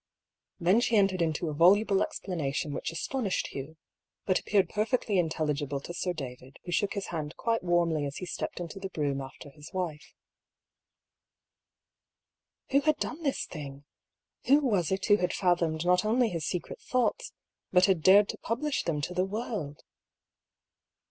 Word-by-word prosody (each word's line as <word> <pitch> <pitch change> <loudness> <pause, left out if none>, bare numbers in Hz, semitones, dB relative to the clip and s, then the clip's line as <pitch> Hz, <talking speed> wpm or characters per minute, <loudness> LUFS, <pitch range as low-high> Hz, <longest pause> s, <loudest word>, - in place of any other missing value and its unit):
Then 185 +5 +4
she 235 - +1
entered 195 -3 +3
into 165 0 0
a 155 - -2
voluble 195 +5 +5
explanation 155 -4 -2
which - - -3
astonished 205 +5 -2
Hugh, 140 +4 -7 0.5
but 185 - +2
appeared 195 -3 +2
perfectly 215 0 0
intelligible 150 -4 -1
to 175 - -8
Sir 180 +1 -1
David, 130 -4 -8
who 175 - -5
shook 200 +3 +1
his 200 -2 -4
hand 155 -2 -4
quite 230 -1 0
warmly 170 -4 +1
as 140 - -7
he 180 - -5
stepped 180 - -4
into 175 +3 -6
the 195 0 -5
brougham 145 -5 -1
after 135 +2 -10
his 150 +1 -13
wife. 170 -5 -4 2.6
Who 280 +1 +4
had 310 +1 +2
done 330 - -4
this 280 -4 -1
thing? 140 -3 -8 0.6
Who 275 +3 +6
was 200 - +1
it 190 +1 0
who 205 -1 +5
had 180 -3 -1
fathomed 170 -3 +1
not 180 +2 +4
only 230 +2 +2
his 165 -5 -3
secret 180 - -4
thoughts, 255 - 0 0.4
but 180 0 +6
had 190 -5 +2
dared 200 +5 +7
to - - -5
publish 285 +5 -1
them 150 -3 -1
to 175 - -3
the 180 +1 +1
world 195 -8 -4
180 Hz, 160 wpm, -29 LUFS, 155-205 Hz, 2.6 s, dared